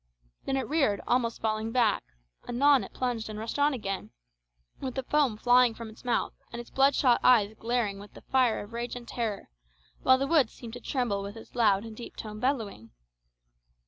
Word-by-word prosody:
Then 270 - 0
it 265 - -2
reared, 275 -10 +1
almost 235 -2 0
falling 220 0 -1
back; 230 -4 +2 0.5
anon 275 +2 +4
it - - -9
plunged 240 -4 -3
and 215 - -6
rushed 225 +6 -4
on 290 +1 +4
again, 195 -7 -4 0.7
with 260 -2 -5
the 265 - -2
foam 275 -5 +1
flying 245 0 +4
from 230 -1 -8
its 220 - -16
mouth, 245 -1 0 0.2
and 235 - -6
its 240 - -10
bloodshot 270 -2 +4
eyes 220 -4 +5
glaring 230 -4 -1
with 205 +1 -13
the - - -11
fire 255 -5 +2
of 205 +3 -13
rage 235 +1 -4
and 240 -1 -8
terror, 225 -4 -3 0.5
while 260 0 +5
the 270 - 0
woods 280 -5 +3
seemed 230 -2 -10
to 245 - -7
tremble 235 -8 -1
with 200 +2 -7
its 225 - -13
loud 210 -3 +3
and 225 -1 -9
deep 235 - -9
toned 215 -1 -7
bellowing. 225 - -2
235 Hz, 195 wpm, -28 LUFS, 215-255 Hz, 0.7 s, eyes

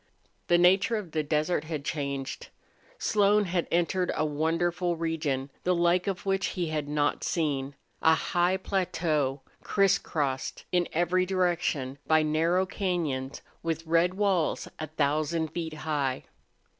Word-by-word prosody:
The 175 - +5
nature 190 +6 +4
of 205 -7 -4
the 155 - 0
desert 155 +2 0
had 155 -3 -4
changed. 140 -3 -3 0.5
Slone 210 0 +3
had 175 -1 -1
entered 175 +1 +1
a 155 - +1
wonderful 165 +3 0
region, 150 -5 -2
the 180 0 +2
like 175 +2 +2
of 195 -1 -3
which 195 0 +1
he 175 -3 -1
had 150 -2 -2
not 145 0 0
seen 140 -4 -1 0.3
a 160 0 +5
high 175 +2 +1
plateau 160 -8 -1 0.2
criss 195 -2 +3
crossed 135 -4 -3
in 175 -1 +2
every 175 +2 +1
direction 170 -7 0
by 160 0 +4
narrow 165 +4 +2
cañons 165 -9 -2 0.2
with 165 0 -3
red 170 +3 +2
walls 195 -5 +1
a 155 - -3
thousand 155 +2 0
feet 160 -1 -4
high. 140 -4 -1
165 Hz, 140 wpm, -28 LUFS, 150-180 Hz, 0.5 s, The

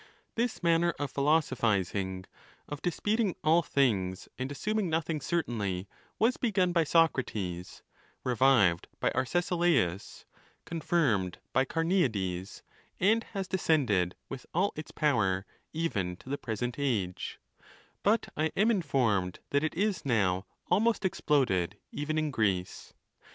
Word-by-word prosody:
This 235 -4 -2
manner 170 0 +3
of 145 -1 -3
philosophizing, 105 - +1 0.4
of 145 -1 -6
disputing 205 +3 0
all 160 +3 +5
things 100 - 0
and 130 +2 -3
assuming 210 +5 -1
nothing 160 -1 -1
certainly, 105 - -2 0.3
was 240 +4 +2
begun 195 -7 +1
by 170 -2 +4
Socrates, 105 - 0 0.4
revived 125 -9 +3
by - - +1
Ar 130 - 0
cesilaus, 170 - 0 0.4
confirmed 145 - 0 0.2
by 130 - +3
Carueades, 110 - -1 0.4
and 220 +5 +3
has 195 -1 -2
descended, 130 - +1
with 135 -2 -8
all 195 +4 +2
its 155 -1 -7
power, 100 -10 +1 0.3
even 100 - -1
to 130 - -14
the 140 - -1
present 120 +2 -3
age; 105 -10 -2 0.6
but 215 +3 +2
I 155 +1 0
am 215 +4 +4
informed 115 - +1
that 140 +1 +2
it 155 - -1
is 200 +1 0
now 95 -7 +1 0.2
almost 220 0 +2
exploded 115 - +1
even 155 +2 -2
in 155 -1 0
Greece. 95 -7 -1
140 Hz, 125 wpm, -30 LUFS, -, 0.6 s, all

